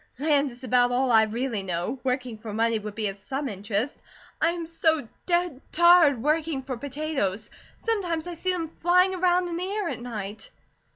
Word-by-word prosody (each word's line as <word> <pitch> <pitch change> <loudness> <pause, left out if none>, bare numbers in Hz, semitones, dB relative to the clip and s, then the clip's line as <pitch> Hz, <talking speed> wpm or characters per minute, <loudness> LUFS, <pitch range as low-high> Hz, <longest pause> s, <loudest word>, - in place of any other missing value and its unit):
Land 285 0 +2
is 245 +1 -8
about 250 -1 +3
all 255 +1 +2
I 220 -1 +7
really 230 0 -2
know. 180 +7 -3
Working 255 -2 -1
for 215 0 -7
money 225 +1 +1
would 210 -1 -7
be 215 -2 0
of 195 - -7
some 270 +7 -4
interest. 205 +4 -3 0.4
I 330 - +4
am 340 -1 -3
so 320 -5 +1 0.2
dead 345 -6 0
tired 335 -7 +6
working 305 -2 0
for 260 -1 -4
potatoes. 260 -6 -3 0.3
Sometimes 360 -8 -1
I 350 - -5
see 370 +3 -1
them 340 -3 -2
flying 360 +4 +3
around 360 -1 +2
in 340 -1 -3
the 355 - -3
air 410 -4 -1
at - - -5
night." 215 -3 -6
275 Hz, 185 wpm, -26 LUFS, 230-335 Hz, 0.4 s, I